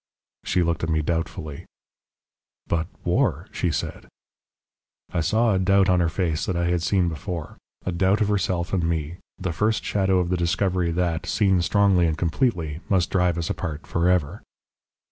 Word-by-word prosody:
"She 90 0 +1
looked 85 -1 -1
at 85 - 0
me 80 -1 +1
doubtfully. 80 -2 -3 1.0
"'But 80 -1 -1 0.2
war - - +1
' - - -31
she - - 0
said. - - -4 1.1
"I 85 - +1
saw 110 +6 +2
a 95 - +2
doubt 95 +1 +3
on 90 -1 +4
her 85 -2 +2
face 80 -2 -1
that 95 - -1
I 85 0 0
had 90 -1 +1
seen 90 +2 +2
before, 85 0 -5 0.3
a 90 - -1
doubt 95 +4 +2
of 105 - +2
herself 95 -3 -1
and 90 -3 +1
me, 80 0 -2 0.2
the 95 -2 -3
first 105 +7 0
shadow 95 -2 +2
of 90 -1 0
the 90 - +1
discovery 90 +1 0
that, 85 0 -1
seen 95 -1 +2
strongly 95 -1 +3
and 80 -1 -1
completely, 85 - 0
must 95 -3 +2
drive 90 -2 +2
us 85 -2 -2
apart 80 -4 -5
for 85 +1 +1
ever. 90 +1 0
90 Hz, 180 wpm, -24 LUFS, 85-95 Hz, 1.1 s, on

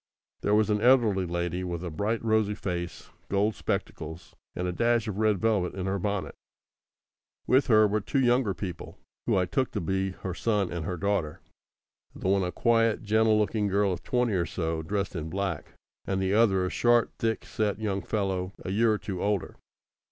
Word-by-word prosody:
There 105 - +2
was 110 0 +3
an 105 0 +1
elderly 115 -7 +4
lady, 85 +1 -2
with 85 -1 -4
a 90 - -4
bright 110 +8 -2
rosy 110 -2 +2
face, 85 -4 -5 0.2
gold 100 +2 +2
spectacles, 80 -3 -5 0.2
and 90 - -2
a - - 0
dash 115 +4 +1
of 105 -1 -3
red 110 -2 +3
velvet 100 -4 0
in 95 -1 -3
her 95 +1 -1
bonnet. 100 0 -2 1.1
With 130 +4 +3
her 110 -3 +6
were 105 +1 0
two 135 +7 -1
younger 120 -5 +2
people, 90 -4 -7 0.3
who - - +3
I 90 - +2
took 130 +8 0
to 105 - -1
be 95 +2 -1
her 95 - -2
son 105 -1 0
and 85 -3 -4
her 90 0 -3
daughter 95 -5 -1 0.8
the - - -4
one 100 0 +3
a 90 -1 -1
quiet, 115 0 +2
gentle 110 +1 +3
looking 105 0 +1
girl 100 0 +2
of 90 - -6
twenty 125 -3 0
or 90 -2 0
so, 80 -2 -2
dressed 100 +4 -2
in 80 -1 -4
black, 95 -4 -3 0.3
and 95 -1 -1
the 95 0 0
other 100 -4 +3
a 90 - -3
short, 120 -1 +3
thick 115 -1 -1
set 105 -2 -1
young 100 -3 -2
fellow, 95 -1 -2
a 95 - -2
year 110 +3 +3
or 105 - +1
two 95 -3 -5
older. 100 -2 -1
100 Hz, 195 wpm, -28 LUFS, 90-110 Hz, 1.1 s, her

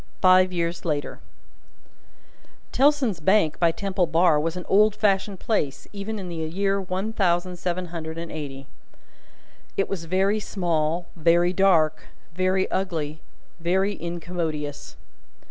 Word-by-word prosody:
Five 185 0 +5
Years 170 -1 -2
Later 150 -4 -2 1.5
Tellson's 265 - +2
Bank 165 -1 +2
by 170 -1 +4
Temple 190 0 -1
Bar 165 -1 +4
was 165 +3 -2
an 180 - -6
old 210 +1 +4
fashioned 200 -2 +1
place, 150 -11 -2
even 205 +2 -4
in 190 -3 -6
the 170 -1 -6
year 195 +5 -1
one 190 +4 -3
thousand 180 -2 0
seven 180 +1 -2
hundred 160 -1 -5
and 165 0 -6
eighty. 135 -3 -6 1.1
It 195 - +1
was 175 -4 -4
very 190 +5 +1
small, 170 -4 -1
very 170 +2 +3
dark, 170 -6 +3 0.3
very 185 +1 +1
ugly, 160 -5 -2 0.4
very 190 +4 +1
incommodious. 165 -4 -4
180 Hz, 130 wpm, -24 LUFS, 165-195 Hz, 1.5 s, Five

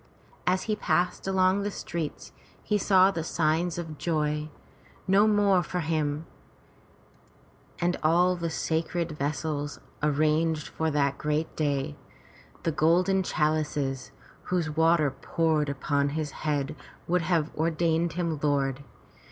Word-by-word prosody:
As 185 +1 +2
he 215 - -1
passed 180 -2 0
along 190 +1 +3
the 205 - -1
streets, 170 -5 -5 0.3
he 210 -1 +1
saw 190 -1 +5
the 165 -4 -3
signs 165 +2 0
of 160 -3 -6
joy, 150 -2 -1 0.6
no 200 +3 +5
more 205 -3 +4
for 180 +1 -3
him, 155 -1 -1 1.5
and 175 +1 +1
all 175 +3 +3
the 170 -1 -3
sacred 165 +1 -1
vessels 145 0 -3 0.2
arranged 155 +1 +1
for 160 0 -1
that 140 -2 0
great 150 +1 -1
day, 140 - -1 0.7
the 165 - +1
golden 175 +5 +3
chalices, 150 -5 -1 0.4
whose 175 -4 -1
water 160 -2 +3
poured 155 +1 0
upon 140 +1 0
his 150 -2 -2
head 150 0 -2 0.3
would 180 +1 +2
have 165 -2 0
ordained 165 +1 +1
him 165 -3 -2
lord. 140 -2 0
160 Hz, 125 wpm, -27 LUFS, 150-175 Hz, 1.5 s, saw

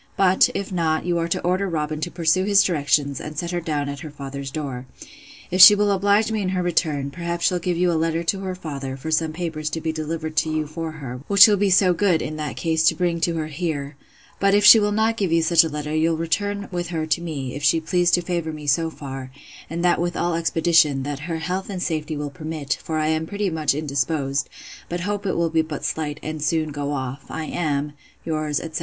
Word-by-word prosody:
But, 190 -1 +4
if 195 - -3
not, 165 -3 0
you 175 -1 0
are 165 - -1
to 170 - -1
order 185 +2 0
Robin 155 -2 -3
to 175 - -2
pursue 170 +1 +1
his 200 0 +5
directions, 145 -5 0
and 150 0 -8
set 170 +2 -3
her 175 -1 -2
down 150 -3 -2
at 140 0 -5
her 160 - -8
father's 140 -1 -7
door. 135 -4 -5 0.6
If 185 +1 +3
she 205 +3 +11
will 205 0 +2
oblige 200 +3 +2
me 220 -1 -1
in 185 - -1
her 180 - 0
return, 150 -5 0
perhaps 170 +1 -3
she'll 180 - +2
give 175 0 -2
you 180 0 +2
a - - 0
letter 165 +1 0
to 190 +3 0
her 190 -1 -4
father, 140 -6 -6
for 160 +4 -6
some 160 0 +1
papers 155 -2 -4
to 160 - -4
be 160 0 -2
delivered 160 0 -4
to 160 - +2
you 155 0 -1
for 160 +1 -6
her; 130 -5 -7
which 200 0 +8
you'll 210 - +4
be 200 0 +1
so 185 -1 +4
good, 180 -2 +2
in 155 - -4
that 150 -6 -4
case, 160 +4 0
to - - +4
bring 175 -2 -1
to 170 0 +1
her 160 -1 -2
here: 150 -2 -4 0.4
But 195 0 +3
if 205 0 +3
she 225 - +10
will 210 0 +1
not 220 +2 +1
give 195 -6 -1
you 165 0 +3
such 165 0 +5
a 160 - -2
letter, 150 0 -4
you'll 160 +1 +1
return 200 +5 -2
with 175 -1 -3
her 165 -2 -3
to 155 +2 0
me, 140 -7 -5
if 145 - -6
she 165 - +4
please 175 +2 +1
to 175 - -3
favour 170 -2 -2
me 150 -1 -8
so 160 +4 +2
far; 135 -4 -8 0.4
and 170 +2 -2
that 175 -1 +3
with 175 0 -2
all 175 0 0
expedition, 165 -4 +2
that 145 0 -4
her 165 - -1
health 180 +5 -3
and 185 -2 -4
safety 155 -2 -2
will 145 -1 -4
permit; 155 -2 -4
for 160 - -3
I 155 0 0
am 160 0 -1
pretty 200 -1 -2
much 155 -3 0
indisposed; 140 -1 -1 0.4
but 175 0 -3
hope 205 +1 -3
it - - -1
will 170 -1 0
be 160 0 +3
but 155 -2 -6
slight, 150 -1 -3
and 155 0 -5
soon 155 0 0
go 145 0 -3
off. 135 0 -4
I 160 - -4
am 150 -3 -2 0.3
'Yours, 155 -2 -1
etc. 160 -1 -5
160 Hz, 245 wpm, -22 LUFS, 150-175 Hz, 0.6 s, she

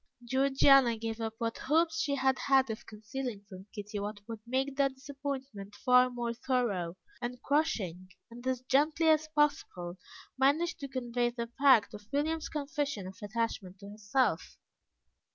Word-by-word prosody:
Georgiana 265 -1 +5
gave 225 0 -4
up 225 0 -3
what 230 0 -3
hopes 320 +3 +2
she 285 -2 0
had 265 -1 +2
had 265 -3 +3
of 220 - -8
concealing 215 0 -6
from 190 0 -11
Kitty 205 -1 -6
what 205 +1 -4
would 225 -2 -6
make 265 +2 -1
the 275 0 +3
disappointment 265 -6 -6
far 250 +2 +5
more 240 -1 -3
thorough, 230 -9 -1 0.2
and 245 0 -4
crushing, 190 - 0 0.2
and 240 +2 -8
as 255 -1 0
gently 305 +5 +2
as 310 0 +4
possible 290 - 0 0.4
managed 305 +7 +2
to 280 - -5
convey 245 -2 -1
the 235 -1 -5
fact 260 -8 +5
of 205 0 -11
William's 310 +3 -1
confession 285 - -3
of 190 +1 -9
attachment 205 -3 -3
to 200 - -9
herself. 210 +5 0
250 Hz, 150 wpm, -31 LUFS, 215-280 Hz, 0.4 s, Georgiana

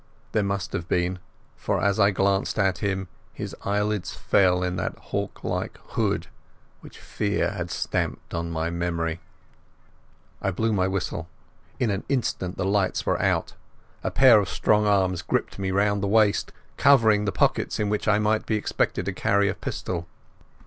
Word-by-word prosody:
There 110 - +2
must 100 -1 -2
have 85 - -3
been, 90 +1 0 0.4
for - - -1
as 100 +1 +1
I 100 -1 +6
glanced 100 0 +1
at 95 -4 +1
him, 95 -2 -1 0.3
his - - -6
eyelids 105 -1 -1
fell 90 -2 +3
in 90 0 -1
that - - -3
hawk - - -5
like - - -3
hood - - 0 0.5
which - - -13
fear 100 -3 -1
had 90 -4 -4
stamped - - -3
on 85 0 -2
my 85 0 -2
memory. 85 -1 -2 1.2
I 95 - 0
blew 110 +4 0
my 95 -2 +2
whistle. 90 -3 -3 0.5
In 120 -4 +1
an 100 0 -2
instant 115 -9 -1
the 95 - -1
lights 100 -1 +1
were - - +1
out. - - 0 0.5
A - - 0
pair 130 -5 +7
of 100 - -2
strong 105 0 +2
arms 95 -3 +2
gripped 85 - -2
me 95 -1 -1
round 100 +1 +1
the 100 - 0
waist, 105 0 +3 0.3
covering 110 -7 +5
the 100 - 0
pockets - - +1
in 105 - +1
which 105 +1 -1
a 105 - +5
man 105 0 +2
might 110 +1 +1
be 110 - +1
expected 105 -3 -1
to 95 - -2
carry 100 +2 +2
a - - 0
pistol. 85 -3 -4
100 Hz, 175 wpm, -25 LUFS, 90-105 Hz, 1.2 s, pair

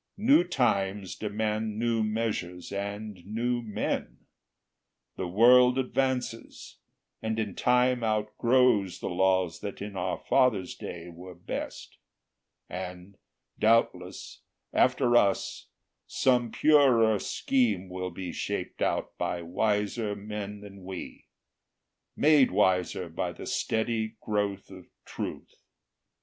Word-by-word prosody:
New 225 +1 +5
times 100 - 0
demand 110 0 -2
new 115 0 +1
measures 105 -5 -3
and 100 -1 -5
new 120 +5 -1
men; 105 - -4 0.9
The 95 - -3
world 125 +6 +6
advances, 130 -2 -2 0.4
and 110 0 -2
in 105 -3 -2
time 125 +1 +2
outgrows 110 -1 +2
The - - -4
laws 95 -1 +1
that 100 - -6
in 100 0 -6
our 90 -1 -2
fathers' 120 -9 +2
day 90 0 -8
were 90 +1 -11
best; - - -7 0.7
And, 90 +1 -7 0.4
doubtless, 100 -5 +1 0.3
after 125 -1 +3
us, 100 -4 +1 0.4
some 125 -3 +2
purer 125 -9 +4
scheme 110 -9 0
Will 90 0 -4
be 90 0 -6
shaped - - -4
out - - -1
by 85 -1 -2
wiser 105 +4 -1
men 105 0 -6
than 100 -2 -12
we, 95 -1 -8 0.9
Made 145 -3 +5
wiser 90 -1 +1
by 80 - -3
the - - -9
steady 110 0 -1
growth 105 -3 -2
of 95 -2 -12 0.2
truth. - - -7
105 Hz, 110 wpm, -28 LUFS, 95-120 Hz, 0.9 s, world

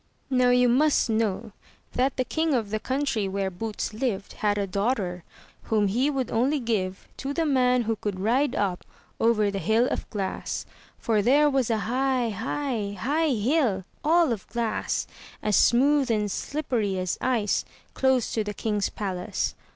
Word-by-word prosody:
Now, 250 -1 +4
you 250 0 +5
must 265 0 +3
know 220 0 -1 0.4
that 260 +2 +1
the 255 - +1
king 320 +2 0
of 220 -4 -1
the 215 - -1
country 260 -5 -1
where 195 0 -2
Boots 215 +4 -4
Uved 215 -3 -3
had 205 -1 0
a 200 - 0
daughter, 195 -3 -1 0.4
whom 210 -3 +2
he 250 +8 +1
would 270 -3 -2
only 260 +6 +2
give 200 -6 -2
to 275 +1 -4
the 330 - +1
man 250 -4 +3
who 225 0 0
could 205 -3 -4
ride 250 +9 +1
up 190 -3 -1 0.4
over 215 -3 +3
the 195 - -3
hill 225 +5 +2
of - - -3
glass, 195 -3 -3 0.3
for 220 -2 +1
there 290 +7 +4
was 265 -4 +1
a 225 - +2
high, 255 0 +1
high, 225 -1 -2
high 305 - +1
hill, 230 - +1 0.2
all 325 -1 +4
of 210 - -7
glass, 230 -2 -1 0.4
as 210 -1 +2
smooth 275 +2 +4
and 210 -3 0
slippery 235 -10 -2
as 185 -1 -2
ice, 235 -5 +1 0.3
close 265 -3 +1
to 220 - 0
the 210 0 -5
king's 210 -3 -1
palace. 185 -3 -3
230 Hz, 165 wpm, -26 LUFS, 205-265 Hz, 0.4 s, you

